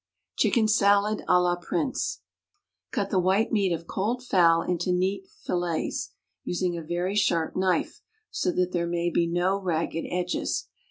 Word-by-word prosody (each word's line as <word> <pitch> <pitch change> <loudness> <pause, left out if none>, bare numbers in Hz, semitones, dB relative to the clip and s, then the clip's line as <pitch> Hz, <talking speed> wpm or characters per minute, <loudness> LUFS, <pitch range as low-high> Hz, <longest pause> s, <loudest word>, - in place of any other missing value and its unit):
Chicken 225 -3 +3
Salad 205 0 +3
à 180 - +6
la 175 0 +2
Prince. 175 +8 -2 0.7
Cut 200 -1 -2
the 190 - +3
white 190 +4 +2
meat 200 -4 +2
of 170 0 -3
cold 230 +8 -2
fowl 170 -7 +4
into 180 0 -1
neat 190 +2 0
fillets, 175 -3 -3 0.3
using 180 0 -1
a 170 - -4
very 175 +4 -2
sharp 170 -6 +1
knife, 185 -1 0 0.3
so 180 - 0
that 180 0 0
there 170 -1 -1
may 170 0 -1
be 170 +1 +2
no 180 +3 0
ragged 165 -2 -1
edges. 180 0 -2
180 Hz, 155 wpm, -26 LUFS, 175-195 Hz, 0.7 s, à